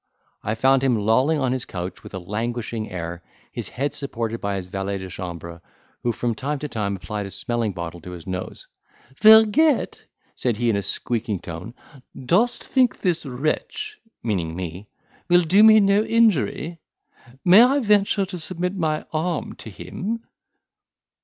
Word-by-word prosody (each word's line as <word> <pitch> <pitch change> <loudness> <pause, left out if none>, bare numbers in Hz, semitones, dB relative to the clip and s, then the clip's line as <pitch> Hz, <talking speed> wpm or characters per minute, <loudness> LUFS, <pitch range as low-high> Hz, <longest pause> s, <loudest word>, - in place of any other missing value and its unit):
I 110 - -2
found 130 +3 +4
him 130 -3 +3
lolling 130 +9 +2
on 130 -3 0
his 130 -1 -1
couch 90 0 -6
with - - -10
a - - -3
languishing 110 +3 -3
air, 85 -1 -5 0.3
his - - -6
head 140 +3 -2
supported 115 -5 -3
by 100 0 -1
his 95 -2 -4
valet 95 +1 -3
de 95 -1 -7
chambre, 85 -2 -7 0.4
who 120 - +1
from 120 0 -1
time 140 +7 -3
to 150 +2 -5
time 105 -6 -2
applied 105 +1 -5
a - - -7
smelling 115 +1 -2
bottle 85 -1 -6
to 90 - -9
his 90 -3 -9
nose. 95 0 -5 0.6
"Vergette," 220 +7 +6 0.3
said 120 -4 -1
he 120 0 +2
in - - 0
a 100 - 0
squeaking 105 0 -2
tone, 85 +9 -8 0.4
"dost 210 - +2
think 255 -4 +2
this 170 -5 0
wretch 425 - -3 0.2
(meaning 90 -8 -1
me) 90 +3 -6 0.4
will 175 0 +6
do 185 +6 +4
me 220 0 +8
no 200 0 +4
injury? 180 - +1 0.7
May 185 +5 +9
I 260 +4 +5
venture 205 -5 +3
to 185 -1 -7
submit 180 +2 -3
my 155 -4 -1
arm 160 +1 -2
to - - -9
him?" 220 - -5
125 Hz, 165 wpm, -23 LUFS, -, 0.7 s, May